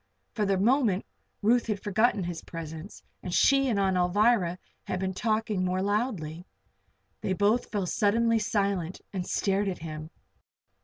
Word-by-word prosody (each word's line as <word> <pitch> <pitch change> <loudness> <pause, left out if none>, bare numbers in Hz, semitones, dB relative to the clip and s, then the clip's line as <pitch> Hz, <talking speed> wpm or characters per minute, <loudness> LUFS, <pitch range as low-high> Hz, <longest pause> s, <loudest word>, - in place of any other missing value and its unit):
For 210 -3 0
the 195 -1 +2
moment 220 -2 +2 0.4
Ruth 235 +3 +3
had 210 -3 -1
forgotten 215 0 +2
his 170 -2 -4
presence 160 +2 -8 0.2
and 180 - -5
she 275 +8 +4
and 215 -4 +1
Aunt 190 -1 +2
Alvirah 180 0 +2 0.3
had 185 - -2
been 190 0 -2
talking 215 -1 0
more 185 +1 0
loudly. 195 -6 -2 0.7
They 190 - 0
both 205 +5 +1
fell 205 -3 -1
suddenly 225 +4 +2
silent 200 -5 -1
and 185 -2 -3
stared 200 0 0
at 185 - -4
him. 155 -1 -7
200 Hz, 150 wpm, -28 LUFS, 180-220 Hz, 0.7 s, she